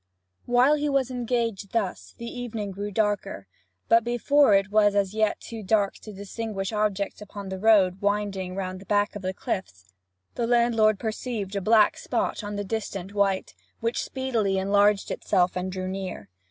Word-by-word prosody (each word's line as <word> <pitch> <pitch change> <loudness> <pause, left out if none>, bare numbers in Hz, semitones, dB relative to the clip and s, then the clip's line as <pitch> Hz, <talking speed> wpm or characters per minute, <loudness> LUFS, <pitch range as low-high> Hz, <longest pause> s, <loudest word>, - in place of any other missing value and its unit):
While 245 +4 +5
he 295 0 -1
was 270 -2 +1
engaged 235 -5 -2
thus 210 -5 -2
the 235 - -7
evening 230 -4 -5
grew 200 +2 -4
darker; 205 - -1 0.4
but 230 0 +5
before 240 +1 +4
it 195 +1 +1
was 205 -1 +4
as 200 -1 +1
yet 220 -1 +1
too 225 -1 -8
dark 200 0 +2
to 215 - -10
distinguish 200 0 -5
objects 210 -1 -1
upon 200 -1 -8
the 190 0 -5
road 195 -3 +4
winding 200 -3 -1
round 185 -1 -4
the 195 - -14
back 205 0 +1
of 205 - -5
the 185 -1 -2
cliffs, 95 - -5 0.4
the 235 - -1
landlord 235 -3 +3
perceived 220 -2 -4
a 200 - -1
black 215 +2 +4
spot - - -2
on 205 0 -5
the 205 - -2
distant 200 -2 -4
white, 200 -2 0 0.3
which 230 +1 -1
speedily 230 -7 -1
enlarged 200 +1 +2
itself 180 -3 +1
and 185 +1 -2
drew 185 0 -4
near. 185 - -5
205 Hz, 170 wpm, -26 LUFS, 195-225 Hz, 0.4 s, While